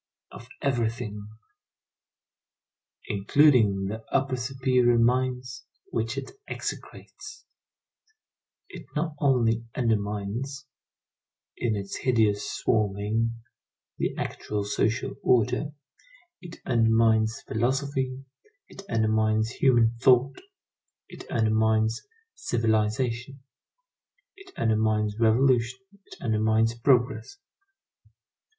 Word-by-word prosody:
Of 115 - -12 0.2
everything. 115 -5 -2 1.8
Including 105 -2 +3
the 110 +3 -5
upper 135 -1 +1
superior 125 -1 +1
mines, 125 +1 0 0.3
which 115 +2 -2
it 135 - -5 0.2
execrates. 290 0 -8 1.2
It - - -11
not 155 +1 -1
only 115 -5 +2
undermines, 110 +4 -2 0.9
in 115 -3 -1
its 100 -1 -5
hideous 110 -5 +1
swarming, 110 +2 0 0.6
the - - -1
actual 105 -1 -3
social 105 +2 -1
order; 125 +5 +2 0.7
it 170 -2 -10
undermines 115 -1 +2
philosophy, 130 +2 -2 0.4
it - - -12
undermines 110 -1 +1
human 120 -4 +3
thought, 130 +2 +3 0.7
it - - -12
undermines 110 0 +1 0.3
civilization, 115 +3 -1 0.9
it 395 -1 -16
undermines 110 -1 0
revolution, 120 +1 +3 0.3
it - - -12
undermines 110 0 +1
progress. 125 - +1
115 Hz, 80 wpm, -26 LUFS, 110-130 Hz, 1.8 s, Including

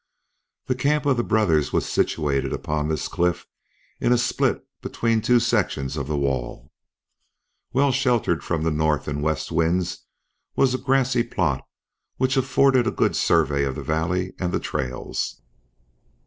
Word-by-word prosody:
The 130 - 0
camp 145 +4 0
of 140 -3 +2
the 120 - +1
brothers 90 -11 +2
was - - 0
situated 70 -3 0
upon 75 0 -2
this 80 -1 -2
cliff 90 0 -1 0.5
in - - +1
a 125 - +5
split 120 0 0 0.2
between 115 -1 0
two 120 +2 +4
sections 95 - 0
of 70 -2 -4
wall. 70 -2 -2 1.0
Well 135 +2 +3
sheltered 125 - +1
from 80 -2 -1
the 80 - +1
north 75 -1 0
and 75 0 -3
west 75 +1 -1
winds 85 +2 0 0.5
was 130 -2 +3
a 130 - -1
grassy 130 -2 +2
plot - - -1 0.5
which 130 +1 +1
afforded 130 -1 +3
a - - +4
good - - +1
survey 70 0 +2
of 65 -1 -2
the - - -6
valley 90 +4 -1
and 90 -2 -1
the - - 0
trails. 65 0 -4
90 Hz, 150 wpm, -23 LUFS, 75-125 Hz, 1.0 s, a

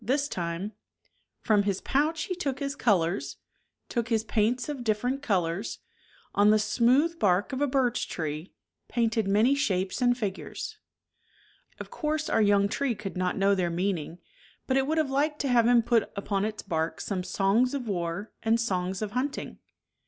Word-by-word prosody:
This 280 +6 +1
time 175 -1 -3 0.7
From 215 -3 +3
his 200 -2 -1
pouch 310 +3 0
he 370 - -3
took 285 -7 -2
his 280 0 -3
colors. 170 - +1 0.5
Took 235 -1 -2
his 225 -2 +1
paints 230 +3 0
of 285 -4 -4
different 245 +5 0
colors, 190 -5 -1 0.6
On 205 +1 +5
the 215 - +6
smooth 250 +10 +2
bark 195 +3 +2
of 265 - -2
a 290 - +3
birch 255 -3 0
tree 155 +1 -4 0.4
Painted 225 -3 0
many 215 +7 +4
shapes 195 -6 0
and 245 0 +3
figures. 245 - -5 1.0
Of - - -8
course 310 0 -2
our - - +3
young 200 -1 +4
tree 255 +3 -1
could 195 -1 -6
not 180 0 -1
know 200 +1 +3
their 180 -3 +1
meaning, 170 -2 -2 0.5
but 260 - 0
it 270 0 +2
would 315 +2 0
have 305 -4 +1
liked 295 +2 +1
to 280 - -1
have 235 -2 +4
him 240 -1 +5
put 230 -2 +2
upon 200 0 -1
its 215 -1 -4
bark 165 -3 -2
some 190 -3 -3
Songs 200 +8 +2
of 255 -4 -4
war 175 +1 -3
and 225 +1 +2
songs 190 -3 -1
of 210 - -4
hunting. 255 +5 -3
220 Hz, 175 wpm, -28 LUFS, 195-265 Hz, 1.0 s, the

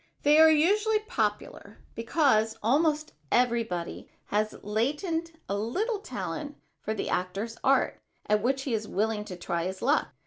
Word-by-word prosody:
They 295 +2 +6
are 320 0 +9
usually 410 +8 +3
popular 215 - -3 0.2
because 230 -3 +2
almost 305 +5 +2 0.2
everybody 230 -8 0 0.2
has 215 +1 -1
latent 320 - -2
a 200 - -1
little 390 - -1
talent 305 -7 -5 0.2
for 220 - -3
the - - -3
actor's 195 +6 -2
art 270 +1 +2 0.2
at 210 0 +2
which 265 +4 0
he 265 - -2
is 215 -1 -1
willing 210 +1 -1
to 185 - -7
try 170 -1 -2
his 190 +1 -4
luck. 285 +5 +2
235 Hz, 145 wpm, -28 LUFS, 210-310 Hz, 0.2 s, are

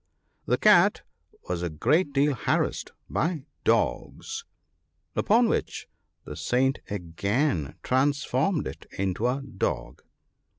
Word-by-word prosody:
The - - +2
cat - - +5 0.4
was 90 -1 -2
a 90 - -1
great 150 - +1
deal 140 +1 +2
harassed 120 - -1 0.2
by 160 -3 -1 0.2
dogs, 445 +1 0 0.7
upon 230 +3 +4
which - - -2 0.4
the - - -7
Saint 130 +2 +1
again 100 - -1
trans 140 +3 +2
formed 150 +7 0
it - - -8
into 95 +4 0
a 135 +2 -1
dog. 125 -8 -3
135 Hz, 115 wpm, -27 LUFS, 100-150 Hz, 0.7 s, cat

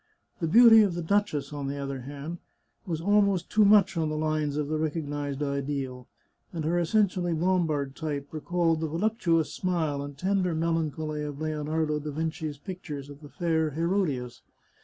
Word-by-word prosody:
The 165 - -1
beauty 225 +4 +8
of 195 -5 +2
the 175 - -3
duchess, 160 -7 0
on 140 -1 -4
the 140 - -3
contrary, 140 +3 -5 0.5
was 165 -3 -2
almost 200 -1 +2
too 215 - +5
much 200 -2 +5
on 160 -2 0
the 155 - -2
lines 155 -2 -1
of 150 -1 -1
the 155 +1 -1
recognised 145 -2 -2
ideal, 140 -3 -3 0.4
and 165 -3 -4
her 175 +2 +1
essentially 180 -1 +1
Lombard 160 -5 0
type 145 -3 -4
recalled 165 +1 0
the 160 - -1
voluptuous 170 -2 0
smile 160 -6 -1
and 145 0 -7
tender 185 0 0
melancholy 160 -2 -1
of 145 -1 -5
Lionardo 155 0 -1
da 150 +1 -5
Vinci's 155 0 -3
pictures 145 -4 -7
of 145 +1 -13
the 145 - -11
fair 160 -3 0
Herodias. 155 -6 -1
155 Hz, 160 wpm, -27 LUFS, 145-175 Hz, 0.5 s, beauty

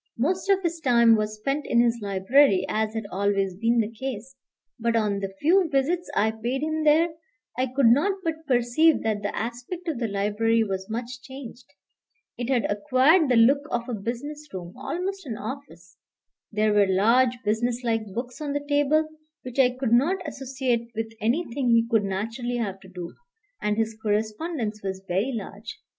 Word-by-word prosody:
Most 360 +10 0
of 390 -1 +3
his 335 -1 -1
time 235 -5 +5
was 215 0 -2
spent 275 +7 -2
in 235 - +3
his 235 0 +3
library, 200 +3 +3
as 220 0 -1
had 220 -2 -3
always 195 -1 0
been 230 +5 +1
the 225 -1 +1
case. 255 +1 -6 0.4
But 235 0 0
on 210 -3 +1
the 195 -1 -5
few 355 +3 +3
visits 310 +5 0
I 220 +1 +3
paid 240 +5 -3
him 315 0 -1
there, 310 +3 +4 0.5
I 255 +1 0
could 260 +1 +1
not 285 - +5
but 320 -1 -4
perceive 255 +5 +3
that 215 -2 -1
the 205 - -3
aspect 245 - -5
of 305 -7 -2
the 235 - 0
library 210 +3 +1
was 190 -1 -4
much 240 +3 -5
changed. 260 -2 -10 0.7
It 240 0 -4
had 245 -5 +2
acquired 270 - +3
the 250 - +4
look 255 +5 +5
of 240 0 -2
a 250 - -3
business 270 +8 -5
room, 180 -1 -7
almost 360 +6 -4
an 225 -4 -4
office. 270 +7 -8 0.5
There 215 0 +2
were 205 -1 +4
large 235 +6 +3
business 235 +3 0
like 225 -2 0
books 245 +6 -6
on 290 -2 -2
the 290 0 -3
table, 290 +2 +2 0.4
which 255 +1 -6
I 255 -2 +6
could 250 -2 -2
not 335 +8 +2
associate 260 -4 -2
with 225 0 -4
anything 250 +2 0
he 230 -1 +4
could 225 -3 +2
naturally 225 +5 -3
have 200 -5 -3
to 190 - -15
do; 180 -2 -7 0.5
and 210 0 0
his 225 0 -1
correspondence 215 +2 -2
was 190 -1 -5
very 195 +8 0
large. 220 - -7
240 Hz, 180 wpm, -25 LUFS, 215-280 Hz, 0.7 s, I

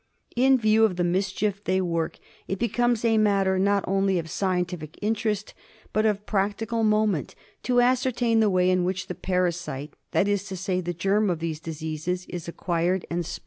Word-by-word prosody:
In 260 +2 +5
view 220 -1 +3
of 210 -5 +3
the 175 - 0
mischief 195 +3 -1
they 185 0 +1
work 170 -3 -1 0.3
it 195 - -2
becomes 240 +1 +1
a 225 -1 +4
matter, 195 -3 +2
not 200 +1 +2
only 195 0 +2
of 165 -2 -4
scientific 180 -5 -2
interest, 215 -1 -1 0.4
but 215 +1 +3
of 210 -1 -1
practi 205 +2 -1
cal 230 -1 -1
moment, 215 -7 +1 0.3
to 245 -1 +3
ascertain 245 -2 +2
the 215 -2 +4
way 185 -1 +3
in 185 -1 +2
which 185 +1 -2
the - - -5
parasite, 175 -6 -2 0.2
that 200 - +2
is 205 -1 0
to 190 -2 -6
say 185 0 -1
the 175 0 -4
germ 200 +4 +2
qf 175 -3 0
these 160 -1 -3
diseases, 160 +3 -4
is 175 -2 -6
acquired 175 +1 -1
and 170 -1 -2
spread. 175 - -5
190 Hz, 185 wpm, -25 LUFS, 175-215 Hz, 0.4 s, In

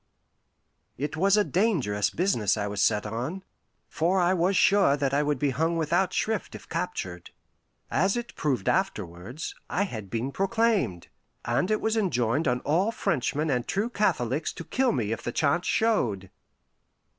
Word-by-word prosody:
It 145 +4 -3
was 195 +5 +3
a 210 - +5
dangerous 155 - +1
business 120 - +1
I 100 - -1
was 100 0 -2
set 105 -1 +2
on, 125 - -4 0.4
for 175 +4 +1
I 175 +1 +3
was 185 +2 +2
sure 195 -8 +4
that 140 -1 0
I 145 - +3
would 150 -1 0
be 140 +1 +1
hung 160 +5 0
without 170 +4 +1
shrift 220 0 -2
if - - -11
captured. 90 - -4 0.6
As 195 +7 +2
it 240 0 -5
proved 130 -10 -1
afterwards, 110 - -2 0.2
I 195 - +1
had 110 - -6
been 120 +5 -2
proclaimed, 195 - 0 0.4
and 120 - +1
it 215 - +1
was 220 0 0
enjoined 140 - +1
on 125 0 +1
all 180 +9 +1
Frenchmen 150 - -1
and 125 -2 -1
true 215 +5 -1
Catholics 150 - 0
to - - -7
kill 260 +8 +1
me 110 -5 -1
if 115 - -3
the 120 - -3
chance 160 +7 +1
showed. 110 - +1
155 Hz, 165 wpm, -27 LUFS, 120-195 Hz, 0.6 s, a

